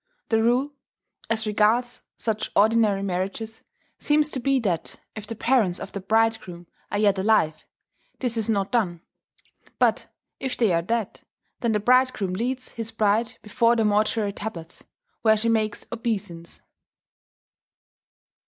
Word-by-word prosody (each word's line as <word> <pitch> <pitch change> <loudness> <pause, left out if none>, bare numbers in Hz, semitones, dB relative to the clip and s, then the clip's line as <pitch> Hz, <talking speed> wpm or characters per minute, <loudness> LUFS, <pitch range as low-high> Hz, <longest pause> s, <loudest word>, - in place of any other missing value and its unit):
The 225 -1 +3
rule, 250 +5 +2 0.6
as 225 -1 0
regards 220 +4 +1 0.2
such 220 -2 -2
ordinary 215 -2 +3
marriages, 195 +4 -3 0.4
seems 300 0 +2
to 260 - -2
be 275 +1 +2
that 180 -7 -2 0.2
if 215 -1 -8
the 230 - -5
parents 220 -6 +1
of - - -7
the 200 - -5
bridegroom 220 -4 0 0.2
are 205 - -2
yet 200 -2 +3
alive, 190 -7 +2 0.5
this 245 -3 -1
is 225 -1 -2
not 200 -3 0
done; 180 -9 0 0.8
but - - +2 0.3
if 265 -1 -3
they 220 -7 +3
are 165 - +2
dead, 225 +3 -2 0.4
then 235 -2 0
the 210 - +2
bridegroom 250 -4 +2
leads 250 +6 -3
his 225 -1 -4
bride 220 +2 +1
before 230 +2 +2
their 225 -2 +2
mortuary 210 0 +1
tablets, 180 -6 -7 0.4
where 220 -1 +4
she 230 +2 +1
makes 220 -2 0
obeisance. 205 -8 -4
220 Hz, 140 wpm, -24 LUFS, 200-235 Hz, 0.8 s, where